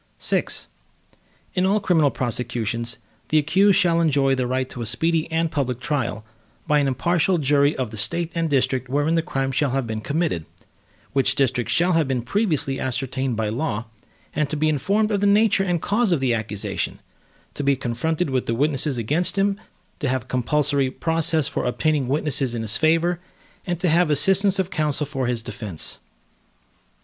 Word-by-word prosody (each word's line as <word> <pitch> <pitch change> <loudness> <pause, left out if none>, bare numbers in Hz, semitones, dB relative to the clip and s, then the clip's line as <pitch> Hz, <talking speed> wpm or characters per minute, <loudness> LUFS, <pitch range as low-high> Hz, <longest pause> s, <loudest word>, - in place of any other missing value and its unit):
VI - - +1 1.1
In 180 - +1
all 200 +3 +3
criminal 165 -7 +3
prosecutions, 120 -2 -2 0.3
the 155 - +3
accused 190 +7 +4
shall 170 -2 +3
enjoy 140 -4 +3
the 130 -2 0
right 130 +1 -1
to 125 -2 -7
a - - -3
speedy 165 +7 0
and 165 0 0
public 130 -4 -1
trial, 120 -6 -2 0.4
by 150 0 +3
an 140 - +1
impartial 175 +6 +1
jury 145 0 +3
of 125 -4 -2
the 110 - -7
State 170 +10 -2
and 165 -1 -1
district 130 -2 +1
wherein 145 +4 +1
the 165 - +3
crime 135 -5 -2
shall 140 +2 +1
have 135 0 -1
been 110 -1 -4
committed, 145 - -1 0.7
which 135 -1 +3
district 130 -4 +1
shall 175 +2 +2
have 165 -4 +2
been 130 -3 -1
previously 155 - 0
ascertained 130 -1 -2
by 110 -1 0
law, 115 -2 -2 0.5
and 150 -1 0
to 155 - -2
be 155 +1 +2
informed 200 +9 +1
of 200 -1 0
the 205 - +3
nature 205 -1 +4
and 175 -4 -1
cause 220 0 +1
of 170 - +2
the 130 -2 +1
accusation; 105 -3 -3 0.5
to 145 - -4
be 140 0 +3
confronted 140 +6 -2
with 130 -1 -1
the 115 - 0
witnesses 140 0 0
against 150 - 0
him; 200 +1 +1 0.4
to 145 - -1
have 130 -3 -2
compulsory 135 +2 +1
process 160 +1 0
for - - -3
obtaining 145 +2 0
witnesses 135 -3 0
in 115 - -3
his 110 0 -1
favor, 165 +2 +2 0.5
and 175 -2 -1
to 180 - 0
have 170 +2 +4
the 150 - +2
assistance 195 +5 +3
of 190 -1 -1
counsel 150 -1 -1
for 135 -3 -3
his 120 -2 -1
defense. 100 -8 -5
145 Hz, 180 wpm, -23 LUFS, 125-165 Hz, 1.1 s, accused